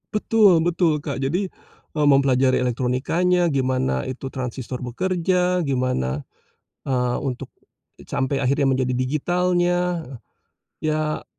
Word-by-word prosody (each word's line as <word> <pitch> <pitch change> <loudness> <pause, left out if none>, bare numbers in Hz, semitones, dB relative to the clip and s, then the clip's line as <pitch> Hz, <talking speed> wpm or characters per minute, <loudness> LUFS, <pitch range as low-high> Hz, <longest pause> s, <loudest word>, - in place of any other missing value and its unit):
Betul 210 -4 +4
betul, 165 -2 +1
Kak. 140 -2 -4
Jadi, 175 +9 0 0.5
eee, 150 -1 +2
mempelajari 135 -1 +3
elektronikanya, 130 +9 +1
gimana 130 - 0
itu 130 +1 -5
transistor 130 -1 -5
bekerja, 180 +6 0
gimana, 125 - -1 0.6
eee, 125 -2 0
untuk 130 -2 -4 0.6
sampai 135 +1 -1
akhirnya 140 +1 +1
menjadi 130 -1 +1
digitalnya. 175 +5 0 0.7
Ya, 155 0 -2
140 Hz, 100 wpm, -22 LUFS, 130-175 Hz, 0.7 s, Betul